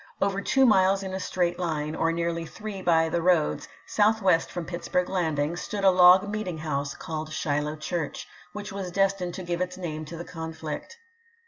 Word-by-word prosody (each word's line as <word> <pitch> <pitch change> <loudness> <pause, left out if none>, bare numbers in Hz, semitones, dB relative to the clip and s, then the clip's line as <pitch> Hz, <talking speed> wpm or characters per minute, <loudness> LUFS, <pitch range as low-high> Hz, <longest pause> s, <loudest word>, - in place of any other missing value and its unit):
Over 200 0 0
two 265 +6 +3
miles 195 -3 +4
in 190 -1 -5
a 190 - -2
straight 175 -2 -1
line, 155 -3 -2
or 165 +1 +1
nearly 170 0 -1
three 200 +4 -7
by 165 -2 +3
the 170 +1 -1
roads, 170 -3 +2 0.2
southwest 205 -5 +2
from 175 -2 -4
Pitts 170 0 -6
burg 180 0 +1
Landing, 160 -4 0
stood 200 +3 -4
a 190 - +7
log 180 +2 +7
meeting 205 -5 -3
house, 145 -3 -3
called 155 -1 -5
Shiloh 150 -3 -1
Church, 155 0 -4 0.2
which 210 +1 -7
was 195 -2 -4
destined 195 -1 0
to 190 - -6
give 175 0 -2
its 180 0 -2
name 155 -4 -4
to 165 +2 -8
the 170 - -6
conflict. 160 - -6
175 Hz, 190 wpm, -26 LUFS, 160-190 Hz, 0.2 s, a